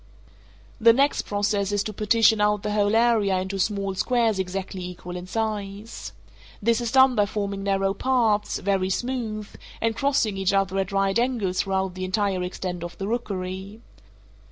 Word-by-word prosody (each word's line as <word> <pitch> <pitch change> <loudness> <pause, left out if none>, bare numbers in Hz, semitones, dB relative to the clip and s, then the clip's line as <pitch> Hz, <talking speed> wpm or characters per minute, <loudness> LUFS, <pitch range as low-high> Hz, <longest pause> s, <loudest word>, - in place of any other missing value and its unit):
The 230 0 +7
next 275 +4 +1
process 205 -1 0
is 205 -1 +1
to 215 - -5
partition 220 +1 +3
out 210 -1 +2
the 210 - -2
whole 205 0 +2
area 225 -5 +3
into 190 +1 -4
small 195 0 0
squares 225 0 +1
exactly 190 0 -4
equal 180 0 -7
in 180 0 -6
size. 210 0 -4 0.5
This 230 +3 +1
is 235 -1 -2
done 260 -1 +6
by 205 -3 +2
forming 200 -1 -3
narrow 195 0 +1
paths, 225 -3 +1
very 190 -1 0
smooth, 220 -1 -3 0.3
and 225 0 0
crossing 250 -6 +1
each 195 0 +1
other 195 -1 +1
at 195 +1 -2
right 195 +2 +1
angles 230 -7 0
throughout 190 -1 -1
the 185 +1 -6
entire 190 -1 0
extent 180 -1 -4
of 175 - -7
the 195 - -4
rookery. 195 -3 -4
200 Hz, 165 wpm, -24 LUFS, 190-225 Hz, 0.5 s, The